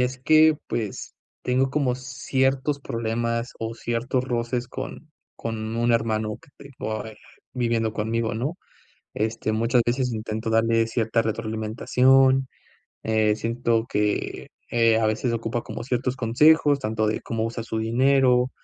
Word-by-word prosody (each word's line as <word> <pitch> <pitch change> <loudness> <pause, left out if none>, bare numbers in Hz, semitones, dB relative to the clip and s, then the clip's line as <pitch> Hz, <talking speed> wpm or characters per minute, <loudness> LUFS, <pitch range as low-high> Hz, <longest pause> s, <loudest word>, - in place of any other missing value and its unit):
es 130 +1 -1
que, 155 +3 +5
pues, 110 -4 -4 0.3
tengo 130 +1 +1
como 130 -3 +1
ciertos 135 +2 -1
problemas 115 0 -2
o 115 0 -3
ciertos 120 +2 -2
roces 120 0 -2
con 135 +5 -8 0.2
con 110 0 -4
un 120 +1 +2
hermano 110 -2 0
que 165 - -20 0.2
tengo 110 -5 -4
ahí 110 -1 -9 0.4
viviendo 115 -3 0
conmigo, 110 +1 -1
¿no? 140 +11 -3 0.6
Este, 110 0 -1
muchas 115 +3 +2
veces 125 +1 0
intento 110 0 -4
darle 115 0 +2
cierta 115 0 0
retroalimentación, 125 +4 +2 0.6
eh, 110 -1 +2
siento 115 0 0
que, 105 0 -1 0.2
eh, 115 -1 +4
a 110 - +2
veces 110 +3 0
ocupa 115 +1 -2
como - - -7
ciertos 125 +1 -1
consejos, 145 +5 +4
tanto 110 -3 -1
de 110 - -1
cómo 115 -1 -2
usar 115 0 -4
su 110 -1 -3
dinero 125 +2 +3
115 Hz, 140 wpm, -24 LUFS, 110-130 Hz, 0.6 s, que